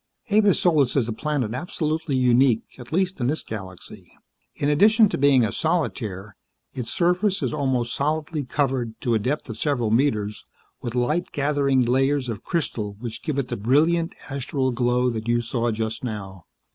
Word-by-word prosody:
"Avis 205 Hz, -2 st, +4 dB
Solis 150 Hz, -8 st, +3 dB
is 130 Hz, -5 st, +2 dB
a 115 Hz, -, -2 dB
planet 130 Hz, -3 st, -2 dB
absolutely 155 Hz, 0 st, -2 dB
unique, 125 Hz, -2 st, +4 dB, 0.2 s
at 120 Hz, -, -11 dB
least 185 Hz, -2 st, 0 dB
in 120 Hz, -, +1 dB
this 150 Hz, +4 st, -1 dB
galaxy. 95 Hz, -4 st, -9 dB, 0.4 s
In 145 Hz, -, -1 dB
addition 210 Hz, +8 st, +5 dB
to -, -, -2 dB
being 135 Hz, -3 st, +5 dB
a -, -, -2 dB
solitaire, 105 Hz, -, -2 dB, 0.4 s
its 125 Hz, -3 st, -5 dB
surface 185 Hz, +3 st, +1 dB
is -, -, -1 dB
almost 130 Hz, -5 st, 0 dB
solidly 150 Hz, +1 st, -1 dB
covered 125 Hz, -4 st, -1 dB
to 120 Hz, -4 st, 0 dB
a 110 Hz, -, +3 dB
depth 130 Hz, +8 st, -2 dB
of 110 Hz, -2 st, -7 dB
several 125 Hz, -7 st, 0 dB
meters 110 Hz, -5 st, +1 dB, 0.4 s
with 120 Hz, 0 st, -5 dB
light 150 Hz, +9 st, 0 dB
gathering 140 Hz, -2 st, +1 dB
layers 135 Hz, +1 st, +1 dB
of 110 Hz, -2 st, -5 dB
crystal 115 Hz, -, -2 dB
which 115 Hz, 0 st, -6 dB
give 155 Hz, -4 st, -3 dB
it 135 Hz, -3 st, -1 dB
the -, -, -2 dB
brilliant, 160 Hz, +10 st, +2 dB
astral 135 Hz, -1 st, -1 dB
glow 125 Hz, 0 st, +1 dB
that 110 Hz, -1 st, -5 dB
you 120 Hz, 0 st, +2 dB
saw 120 Hz, 0 st, -1 dB
just 110 Hz, +1 st, -3 dB
now. 95 Hz, -6 st, -6 dB
130 Hz, 170 wpm, -24 LUFS, 115-150 Hz, 0.4 s, addition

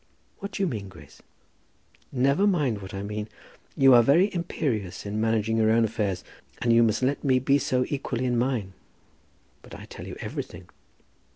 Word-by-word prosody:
"What 200 Hz, -, -6 dB
do 200 Hz, -, -1 dB
you -, -, +2 dB
mean, 105 Hz, -, -5 dB
Grace?" 80 Hz, -6 st, -15 dB, 0.9 s
"Never 140 Hz, +9 st, +2 dB
mind 140 Hz, -, +1 dB
what 95 Hz, -, -8 dB
I 95 Hz, 0 st, -5 dB
mean. 105 Hz, +1 st, -5 dB, 0.5 s
You 135 Hz, -1 st, +7 dB
are 120 Hz, -, +8 dB
very 165 Hz, -, +3 dB
imperious 120 Hz, -, -3 dB
in 105 Hz, +1 st, -2 dB
managing 110 Hz, 0 st, +1 dB
your 110 Hz, -1 st, +3 dB
own 115 Hz, +1 st, +4 dB
affairs, 100 Hz, -4 st, -2 dB, 0.4 s
and 120 Hz, -1 st, +2 dB
you 115 Hz, -, +6 dB
must 115 Hz, +2 st, +2 dB
let 140 Hz, +3 st, 0 dB
me 130 Hz, -3 st, +3 dB
be 135 Hz, +2 st, +2 dB
so 125 Hz, -1 st, 0 dB
equally 130 Hz, -3 st, -3 dB
in 125 Hz, -1 st, +1 dB
mine." 120 Hz, -6 st, -1 dB, 0.9 s
"But -, -, -12 dB
I -, -, -10 dB
tell -, -, -10 dB
you -, -, -7 dB
everything." -, -, -6 dB
120 Hz, 180 wpm, -26 LUFS, 105-135 Hz, 0.9 s, are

